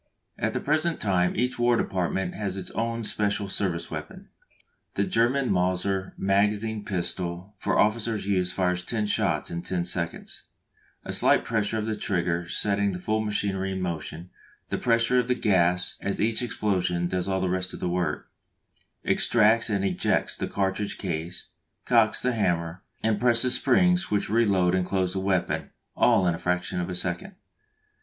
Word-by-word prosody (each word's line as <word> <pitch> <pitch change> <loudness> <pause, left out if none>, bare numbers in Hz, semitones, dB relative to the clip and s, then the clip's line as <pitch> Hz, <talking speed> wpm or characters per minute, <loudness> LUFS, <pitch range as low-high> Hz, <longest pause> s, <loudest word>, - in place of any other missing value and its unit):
At - - 0
the - - -1
present 155 +3 0
time 90 -3 +1
each 125 +2 -1
War 120 0 +3
Department 95 -1 -1
has 100 -3 -3
its 95 - -6
own 115 0 -2
special 105 -1 0
service 95 -3 -2
weapon. - - -7 0.7
The 100 - +2
German 120 +5 +1
Mauser 95 +1 0
magazine 105 +2 +1
pistol 90 0 -3
for - - 0
officer's 110 -1 +1
use 90 -3 +1
fires 90 -1 0
ten 110 +1 -1
shots 100 -7 0
in 85 0 -3
ten 85 -1 -2
seconds, 85 -1 -3 0.6
a - - -4
slight - - +3
pressure 110 -1 0
of 110 - -2
the 110 -1 -1
trigger 90 -4 -1
setting 100 -1 +1
the 90 - -5
full 110 +4 0
machinery 100 -2 -1
in 95 - -3
motion; 85 0 -5 0.4
the - - -2
pressure 120 +1 +3
of 125 0 0
gas 90 -4 +2
at 100 - -1
each 110 +2 +1
explosion 90 -7 0
does 90 +1 -2
all 95 -1 0
the 95 - 0
rest 95 0 -1
of - - -7
the - - -2
work 90 -3 -2 0.8
extracts 115 +2 +3
and 100 -2 0
ejects 95 -2 0
the - - -3
cartridge 100 +1 -2
case, 85 -1 -5 0.4
cocks 115 -3 +3
the 125 0 +1
hammer, 85 -4 -1 0.2
and 110 -2 +1
presses 120 +1 +4
springs 180 0 +3
which 105 -1 -1
reload 100 -6 +3
and 95 -1 +1
close 95 -2 0
the 95 - -1
weapon, 95 -1 -1 0.3
all 95 - +4
in 90 - +2
a 80 - -6
fraction 90 0 -1
of 90 - -3
a 90 - -3
second. 90 -1 -2
95 Hz, 165 wpm, -26 LUFS, 90-110 Hz, 0.8 s, presses